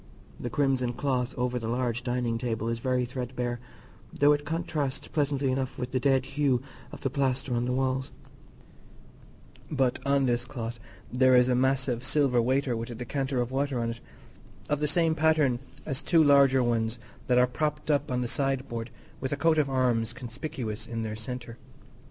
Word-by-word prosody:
The 120 - -3
crimson 130 -2 +1
cloth 125 0 -1
over 125 0 0
the 115 - -4
large 120 0 -1
dining 120 -2 -1
table 115 -2 -2
is 115 0 -2
very 125 0 +1
threadbare, 125 -1 -3 0.5
though 145 +1 +4
it 145 0 -2
contrasts 155 -4 -2
pleasantly 140 -3 0
enough 130 0 -2
with 125 0 -4
the 130 - +1
dead 135 0 +2
hue 135 -3 +1 0.3
of - - -10
the 135 - -1
plaster 135 -1 0
on 120 0 0
the 125 - -1
walls; 130 0 0 1.6
but 135 -5 +1
on 140 0 +2
this 120 -1 +1
cloth 120 -2 -6 0.3
there 130 0 +5
is 125 0 +6
a 130 - +2
massive 130 -1 +1
silver 135 -3 +3
waiter 130 +1 +1
with 115 +1 -4
a 120 - -6
decanter 130 +2 -2
of 120 0 -1
water 135 -1 0
on 115 0 -1
it, 115 - -8 0.7
of 150 - +1
the 150 - +1
same 165 +1 +2
pattern 155 -5 +3 0.3
as 135 -4 -2
two 165 -3 +4
larger 140 -3 +5
ones 115 -1 0 0.3
that 125 - +3
are 125 - +6
propped 150 +4 -2
up 145 - +1
on 125 -1 0
the 125 - -1
sideboard 130 -2 -1 0.3
with 130 - -3
a 145 - -1
coat 160 +1 +3
of 145 -2 +1
arms 120 -3 +1
conspicuous 125 -2 -5
in 115 -1 -3
their 110 -1 -3
centre. 120 +1 -7
130 Hz, 180 wpm, -28 LUFS, 120-140 Hz, 1.6 s, is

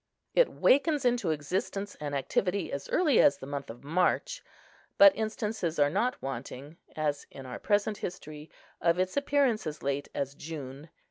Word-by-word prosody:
It - - +5
wakens 285 0 +3
into 240 -7 +2
existence 185 +6 -2
and 145 -1 -4
activity 180 +8 -1
as 140 - -5
early 310 -9 +4
as 140 - +5
the 135 - -9
month 140 -1 -5
of 115 +3 -10
March; 180 - 0 0.5
but 295 -1 +8
instances 215 -6 -2
are 145 -1 +3
not 250 +9 0
wanting, 135 +3 -6 0.2
as 150 -2 -2
in 135 - -10
our 125 -1 -7
present 205 0 +1
history, 155 -4 -7 0.3
of 170 0 +3
its 185 0 -1
appearance 280 - +1
as 150 - -6
late 140 +1 -1
as 140 0 -2
June. 145 -1 -8
165 Hz, 160 wpm, -29 LUFS, 145-220 Hz, 0.5 s, but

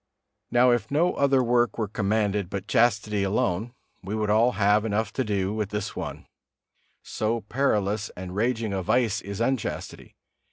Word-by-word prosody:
Now, 125 +1 +4
if 120 -1 0
no 165 +5 +2
other 135 -2 +3
work 120 -2 +2
were 110 -2 -1
commanded 105 -1 0
but 100 0 -5
chastity 105 -3 +2
alone, 100 +2 0 0.3
we 100 +3 -4
would 105 -1 0
all 115 +4 +4
have 105 +1 +3
enough 110 0 -1
to 130 - 0
do 100 -3 -1
with 105 -2 -2
this 105 -1 -4
one; - - -6 0.8
so 110 +2 -2
perilous 105 -4 0
and 90 0 -7
raging 115 -1 0
a 95 - -1
vice 115 +2 +1
is 100 +1 -7
unchastity. 125 0 -3
110 Hz, 160 wpm, -26 LUFS, 100-120 Hz, 0.8 s, Now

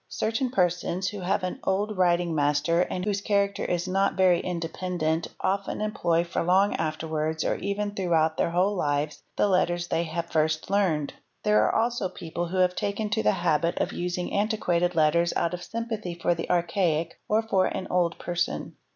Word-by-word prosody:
Certain 230 +4 -1
persons 180 -3 0
who 205 - -7
have 185 +1 0
had 180 - -1
an - - -13
old 205 +3 0
writing 175 -2 +2
"master 150 +3 +2
and 180 +1 -2
whose 200 -1 -1
character 200 -1 +1
is 175 +1 -1
not 195 +2 +1
very 185 -2 +4
independent 170 -2 -2
often 195 +1 -1
employ 170 -6 +1
for 170 - -2
long 190 +4 +3
afterwards, 155 0 -2
or - - +2
even 205 +1 -2
throughout 165 -5 +1
their - - +1
whole 185 +4 +1
lives, 145 -3 -1 0.2
the - - +3
letters 175 -2 +1
they 170 - 0
have 165 +1 -3
first 155 +1 0
learned. 170 -8 +1 0.3
'There 210 0 +4
are - - -1
also 230 -4 0
people 175 -1 -5
who 185 +3 -4
have 180 0 +3
taken 205 +1 -2
to - - +1
the 105 0 +3
habit 165 0 +1
of - - -1
"using 180 0 -3
antiquated 180 -4 +1
letters 170 +2 +3
out 170 - 0
of 175 - -4
sympathy 220 -5 -4
for 175 - +2
the 165 -1 -5
archaic 170 -2 0
or 220 +1 +3
for 195 -4 +2
an 185 - -4
old 175 -2 +2 0.3
n. - - -6
180 Hz, 185 wpm, -26 LUFS, 165-200 Hz, 0.3 s, very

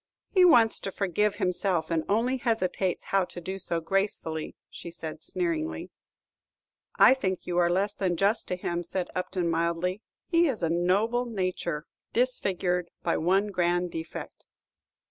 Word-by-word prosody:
"He 370 -2 +5
wants 240 -11 +6
to 195 - -5
forgive 200 +2 0
himself, 180 -3 0
and 165 -1 +1
only 235 +6 +2
hesitates 200 -6 0
how 195 -1 +2
to 175 - -6
do 190 +3 -5
so 170 -2 -2
gracefully," 165 -3 -2 0.2
said 165 -2 -7
she, - - -8
sneeringly. 165 - -2 1.0
"I - - +8
think 190 -9 -2
you 175 0 0
are 175 -1 +4
less 195 +3 +1
than 185 -4 -1
just 205 +5 +1
to 180 - -1
him," 175 -1 -3
said 180 +1 -3
Upton, 185 -1 -2
mildly; 170 +4 0 0.3
"his 335 -1 +4
is 225 -9 -3
a 165 - +2
noble 200 +8 +2
nature, 185 -7 -2 0.3
disfigured 185 -8 0
by 170 - +1
one 195 +5 +2
grand 175 -1 +1
defect." 160 0 -7
185 Hz, 150 wpm, -28 LUFS, 170-205 Hz, 1.0 s, I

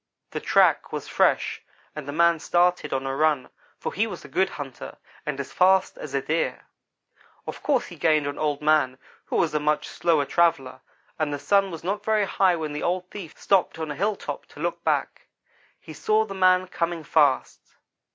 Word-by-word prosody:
"The - - -3
track - - +3
was - - -5
fresh - - +1 0.3
and 150 -2 -7
the - - -3
man 170 +2 +3
started 175 +2 +1
on 135 0 -1
a 135 0 -2
run, 150 -3 +1 0.3
for - - -5
he 220 +4 +1
was - - -8
a - - -8
good 190 0 +1
hunter 135 -7 -8 0.3
and 145 -2 -2
as 140 - -6
fast 190 +1 +3
as 140 -2 -7
a 135 - 0
Deer. 160 +3 -1 0.8
Of - - -7
course 280 -4 +1
he 175 - -11
gained 155 -1 +2
on 145 0 -4
Old 150 -1 -1
man, 150 -4 +3 0.3
who - - -4
was 165 - +2
a 150 - +1
much 150 0 0
slower 160 -4 +1
traveller; 135 -6 +1 0.4
and 155 -2 0
the 145 - -2
Sun 195 +8 +2
was 165 -3 -8
not 200 +3 -2
very 215 -1 +2
high 190 -2 +2
when 155 -3 -4
the 150 - -4
old 180 +1 -2
thief 185 -7 -9
stopped 195 -4 +2
on 160 -2 -4
a - - -5
hilltop 205 +5 -3
to - - -15
look - - -3
back. - - -1 0.5
He - - -11
saw 215 0 +1
the 195 - -7
man 185 -1 +4
coming 170 -2 -3
fast. 145 -3 +1
165 Hz, 200 wpm, -25 LUFS, 145-185 Hz, 0.8 s, man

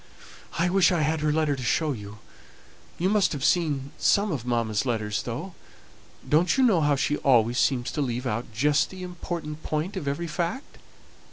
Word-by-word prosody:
"I 170 +1 +2
wish 185 -1 +4
I 175 -3 +1
had 155 +1 +1
her 150 0 +1
letter 155 -2 +1
to 130 - -7
show 150 +5 +1
you; 105 -4 -7 0.8
you 180 - 0
must 200 -3 +2
have 140 -1 -2
seen 145 -5 +1
some 205 0 +3
of 125 -6 -4
mamma's 115 -3 0
letters, 110 -5 -1
though; 155 +11 -6 0.7
don't 165 - +3
you 265 - +4
know 205 -10 +4
how 145 -1 +3
she 145 +2 0
always 120 -2 +3
seems 125 -3 +1
to 150 - -2
leave 125 -1 -2
out 115 0 -3
just 145 +6 +2
the 185 -1 -9
important 170 -3 -6
point 155 +6 -3
of 160 -7 -4
every 145 +5 -2
fact? 170 - -4
150 Hz, 185 wpm, -26 LUFS, 125-170 Hz, 0.8 s, wish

